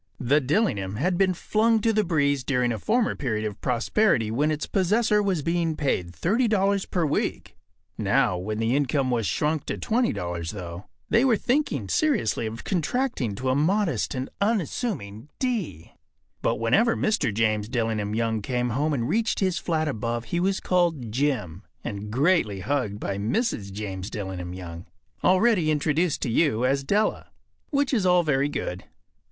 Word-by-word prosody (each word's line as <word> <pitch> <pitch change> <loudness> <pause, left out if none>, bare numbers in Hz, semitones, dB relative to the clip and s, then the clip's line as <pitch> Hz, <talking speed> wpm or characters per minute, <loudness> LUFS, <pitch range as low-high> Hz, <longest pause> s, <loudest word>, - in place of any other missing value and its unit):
” - - -40
The 140 +5 +3
“Dillingham” 125 - 0
had 175 - 0
been 185 0 +2
flung 220 +5 +2
to 225 +1 +2
the 215 0 +2
breeze 145 -6 +1
during 125 -2 +1
a 110 - -3
former 240 - +1
period 110 -5 -2
of 105 -2 -5
prosperity 125 - +1
when 145 +7 +1
its 150 -1 -1
possessor 210 +3 +2
was 190 -7 0
being 165 -1 0
paid 90 -13 -1
$30 200 - +1
per 175 -3 +1
week. 145 - -2 0.4
Now, - - +2
when 100 +4 -3
the 115 +3 +1
income 140 -2 +1
was 115 -4 0
shrunk 155 -1 -1
to - - -2
$20, 85 - -1
though, 90 0 -7 0.2
they 230 +2 +4
were 250 -5 +4
thinking 240 - 0
seriously 120 - +1
of 110 +2 -7
contracting 180 - -1
to 130 +5 -2
a - - +1
modest 175 +2 +1
and 130 +1 -3
unassuming 185 - -2
D. 215 - -3 0.5
But - - +1
whenever 200 - +2
Mr. 215 - +1
James 110 0 0
Dillingham 110 -4 -1
Young 115 -1 0
came 125 +2 -1
home 150 +6 0
and 120 -4 -1
reached 225 - 0
his 185 -4 +1
flat 155 -2 -1
above 120 -2 -2
he 175 - +2
was 190 +2 +1
called 165 -10 0
“Jim” 120 - -1 0.2
and 105 -2 -5
greatly 130 - +2
hugged 115 -4 -1
by 100 -2 -3
Mrs. 110 - -1
James 95 -1 -5
Dillingham 95 -3 -5
Young, 85 -2 -8 0.4
already 185 -3 +4
introduced 155 +2 +1
to - - -1
you 125 -3 +2
as 135 +1 +1
Della. 205 +9 0 0.4
Which 280 -1 +1
is 205 -7 +2
all 180 -1 +5
very 140 -2 +1
good. 90 -9 -4
140 Hz, 165 wpm, -25 LUFS, -, 0.5 s, all